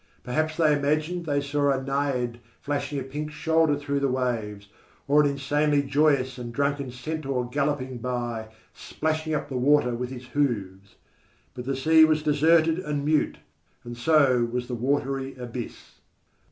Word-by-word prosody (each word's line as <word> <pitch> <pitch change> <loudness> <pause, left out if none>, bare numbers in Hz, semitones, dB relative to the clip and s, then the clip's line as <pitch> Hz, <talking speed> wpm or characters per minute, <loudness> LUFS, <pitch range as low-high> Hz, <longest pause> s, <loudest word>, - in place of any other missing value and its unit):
Perhaps 155 +5 -1
they 155 -3 +4
imagined 155 +4 -1
they 145 -1 +1
saw 145 0 0
a 135 -1 +2
naiad 135 -3 -1 0.2
flashing 145 0 -3
a - - -4
pink 150 +3 -5
shoulder 160 0 +2
through 140 0 -2
the 140 - +1
waves, 115 -6 -2 0.4
or 145 +2 +5
an 145 - +3
insanely 145 +1 +1
joyous 135 -2 +1
and 120 -1 -6
drunken 140 +1 -1
centaur 130 0 -3
galloping 135 -1 -2
by, 120 -2 -3 0.3
splashing 155 0 -2
up 145 - -3
the 135 -3 -4
water 130 -1 +3
with 125 +1 -3
his 130 -1 -8
hoofs. 100 -9 -2 0.6
But 125 -1 -7
the 135 +1 -1
sea 160 +4 +5
was 155 -1 +3
deserted 160 +2 +3
and 150 -5 -3
mute, 155 0 +1 0.5
and 120 0 -7
so 130 -2 +3
was 125 0 -3
the 125 - -5
watery 135 +2 -1
abyss. 125 -1 -8
140 Hz, 155 wpm, -26 LUFS, 125-150 Hz, 0.6 s, or